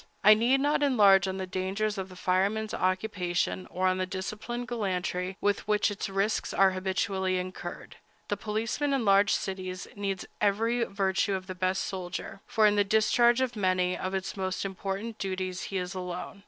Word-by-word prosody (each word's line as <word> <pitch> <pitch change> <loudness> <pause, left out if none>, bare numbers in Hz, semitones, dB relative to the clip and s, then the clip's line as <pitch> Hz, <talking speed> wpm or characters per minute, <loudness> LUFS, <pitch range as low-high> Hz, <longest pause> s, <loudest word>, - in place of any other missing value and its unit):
I 210 +1 +9
need 240 +5 +3
not 290 +1 +2
enlarge 200 -9 +5
on 190 0 -3
the 190 - -3
dangers 190 +3 -2
of 190 0 -5
the 185 - -12
fireman's 200 +4 0
occupation, 185 -1 -1
or 185 +1 -2
on 185 0 +1
the 185 - -1
disciplined 215 +6 -5
gallantry 185 -4 -2
with 205 0 0
which 210 0 +2
its 200 -1 -4
risks 195 +3 -1
are 195 -1 +5
habitually 190 0 -1
incurred. 185 0 -6 0.3
The 205 - 0
policeman 225 +8 -1
in 265 -4 0
large 200 0 +5
cities 185 -1 -3
needs 195 -2 -3 0.2
every 225 +4 +2
virtue 195 0 0
of 185 -1 -5
the 185 - -5
best 185 +1 0
soldier, 185 +1 -5
for 220 - +3
in 210 0 +4
the 205 - +5
discharge 235 +4 +3
of 250 -2 -1
many 185 -2 +1
of 185 0 -4
his 190 0 -3
most 190 0 -2
important 195 +3 -4
duties 185 -1 -3
he 195 - -2
is 180 0 -3
alone. 180 +1 -6
195 Hz, 180 wpm, -29 LUFS, 185-215 Hz, 0.3 s, I